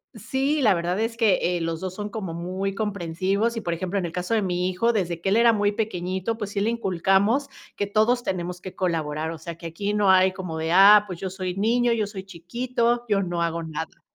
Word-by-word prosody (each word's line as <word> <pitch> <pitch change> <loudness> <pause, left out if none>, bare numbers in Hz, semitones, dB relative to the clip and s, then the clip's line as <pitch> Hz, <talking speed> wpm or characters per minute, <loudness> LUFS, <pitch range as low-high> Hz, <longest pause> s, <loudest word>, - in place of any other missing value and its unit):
Sí, 280 +3 -1
la 210 -5 +5
verdad 175 +2 -1
es 225 +1 -2
que 220 -5 +4 0.2
eh, 175 - -2
los 165 -1 -3
dos 185 -1 -4
son 210 +2 -5
como 200 -6 -5
muy 185 +3 -3
comprensivos 200 +2 -1
y 225 - -3
por 170 -4 -2
ejemplo, 185 +3 -2
en 180 - -2
el 170 - -4
caso 180 +5 -3
de 220 - +3
mi 180 -2 -1
hijo, 185 +6 +1
desde 175 -6 -2
que 195 - 0
él 205 - +3
era 235 0 +5
muy 205 -1 +2
pequeñito, 190 0 -2
pues 210 -3 -5
sí 200 - -3
le 225 +3 +1
inculcamos, 200 +5 +1 0.3
que 205 - -1
todos 220 +4 +2
tenemos 180 -2 -3
que 185 - -9
colaborar, 160 -4 -1
o 165 - -5
sea, 165 +1 -7
que 170 0 -8
aquí 200 +5 -3
no 205 -2 +2
hay 185 0 +5
como 180 -4 -5
de: 160 +1 -2
"Ah, 200 +3 +8
pues 180 -4 -7
yo 190 - -3
soy 185 -1 -4
niño, 235 +4 +2
yo 215 -3 0
soy 195 -2 -7
chiquito, 235 +7 -2
yo 205 -3 +2
no 175 -2 -1
hago 170 0 -2
nada". 160 0 -6
190 Hz, 240 wpm, -24 LUFS, 175-215 Hz, 0.3 s, Ah